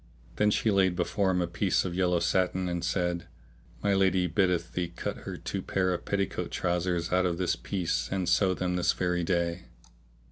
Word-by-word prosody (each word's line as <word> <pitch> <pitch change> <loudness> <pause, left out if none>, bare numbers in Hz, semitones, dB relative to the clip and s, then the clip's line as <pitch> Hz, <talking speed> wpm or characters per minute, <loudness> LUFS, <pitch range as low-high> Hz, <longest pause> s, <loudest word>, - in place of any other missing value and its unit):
Then 105 - +4
she 110 +1 +2
laid 95 -2 +3
before 95 +2 0
him 90 -1 +2
a - - -2
piece 90 +3 +1
of 90 - -3
yellow 90 -1 +2
satin 95 +1 +1
and 85 -1 -2
said, 90 -2 -1 0.6
My 100 -1 +3
lady 95 -2 +3
biddeth 90 -1 +1
thee 90 -1 -1
cut 85 - -5
her - - -4
two - - -4
pair 95 -1 0
of 90 - -5
petticoat 100 -2 -1
trousers 90 -1 -1
out 90 0 +3
of 85 -1 -2
this 90 -1 0
piece 85 -11 -2
and 95 -2 -1
sew 95 +2 +3
them 90 0 -1
this 90 - +2
very 90 -1 0
day." 85 0 -1
90 Hz, 190 wpm, -29 LUFS, 85-95 Hz, 0.6 s, Then